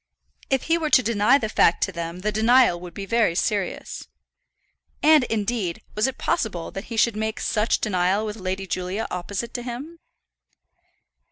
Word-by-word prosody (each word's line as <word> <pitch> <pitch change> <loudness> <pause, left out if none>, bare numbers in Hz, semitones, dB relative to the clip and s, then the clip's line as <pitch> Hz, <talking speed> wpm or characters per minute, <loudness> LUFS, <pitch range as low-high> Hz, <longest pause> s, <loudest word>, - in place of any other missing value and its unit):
If 270 -1 +1
he 330 +1 +1
were 310 -2 -1
to 260 -3 +5
deny 225 +3 +3
the 225 - -2
fact 175 -5 +3
to 195 - -1
them 170 0 -6
the 215 +2 0
denial 225 -2 +4
would 175 -1 -10
be 200 - -5
very 225 -5 +2
serious. 200 0 -2 1.0
And, 305 -3 +6
indeed, 210 -5 -2
was 210 +4 +1
it 265 - -4
possible 180 -7 -2
that 195 - -7
he 230 - -6
should 225 0 +3
make 220 +1 -3
such 215 +1 +1
denial 190 +1 +1
with 210 0 -5
Lady 190 0 -3
Julia 185 +3 -3
opposite 195 +5 -4
to 245 - -3
him? 260 +8 -7
215 Hz, 170 wpm, -23 LUFS, 185-240 Hz, 1.0 s, And